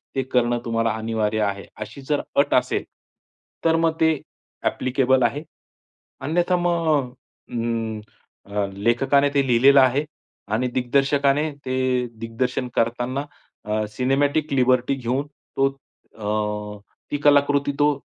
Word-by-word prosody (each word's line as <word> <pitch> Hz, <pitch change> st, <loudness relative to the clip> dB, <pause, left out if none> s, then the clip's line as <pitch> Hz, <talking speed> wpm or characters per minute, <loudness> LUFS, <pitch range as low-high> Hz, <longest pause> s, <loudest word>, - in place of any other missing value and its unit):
ते 135 Hz, -, +1 dB
करणं 120 Hz, -2 st, +1 dB
तुम्हाला 115 Hz, -1 st, +1 dB
अनिवार्य 110 Hz, -1 st, -1 dB
आहे, 100 Hz, -1 st, -2 dB, 0.2 s
अशी 110 Hz, +6 st, -7 dB
जर 150 Hz, -, +2 dB, 0.2 s
अट -, -, +3 dB
असेल, -, -, +1 dB, 0.8 s
तर 165 Hz, 0 st, +4 dB
मग 165 Hz, -1 st, +2 dB
ते 160 Hz, 0 st, +5 dB, 0.5 s
अ‍ॅप्लिकेबल 130 Hz, 0 st, +2 dB
आहे. 140 Hz, +6 st, 0 dB, 0.8 s
अन्यथा 175 Hz, +4 st, +1 dB
मग 175 Hz, -2 st, 0 dB, 0.6 s
अ, -, -, -10 dB, 0.9 s
अं, 100 Hz, 0 st, -2 dB
लेखकाने 135 Hz, +5 st, +3 dB
ते 140 Hz, -1 st, +2 dB
लिहिलेलं 135 Hz, +3 st, +6 dB
आहे 130 Hz, +4 st, +3 dB, 0.5 s
आणि 125 Hz, +3 st, +1 dB
दिग्दर्शकाने 140 Hz, +3 st, +2 dB
ते 130 Hz, 0 st, -1 dB, 0.4 s
दिग्दर्शन 125 Hz, +3 st, -2 dB
करताना 120 Hz, +4 st, 0 dB, 0.4 s
अ, 105 Hz, 0 st, -1 dB
सिनेमॅटिक 140 Hz, +6 st, 0 dB
लिबर्टी 130 Hz, 0 st, +3 dB
घेऊन 130 Hz, +2 st, -2 dB
तो 135 Hz, -1 st, -2 dB, 0.5 s
अ, 105 Hz, -1 st, -3 dB, 0.3 s
ती 145 Hz, -, 0 dB
कलाकृती 145 Hz, -1 st, +4 dB
तो 145 Hz, 0 st, +4 dB
130 Hz, 120 wpm, -23 LUFS, 115-145 Hz, 0.9 s, लिहिलेलं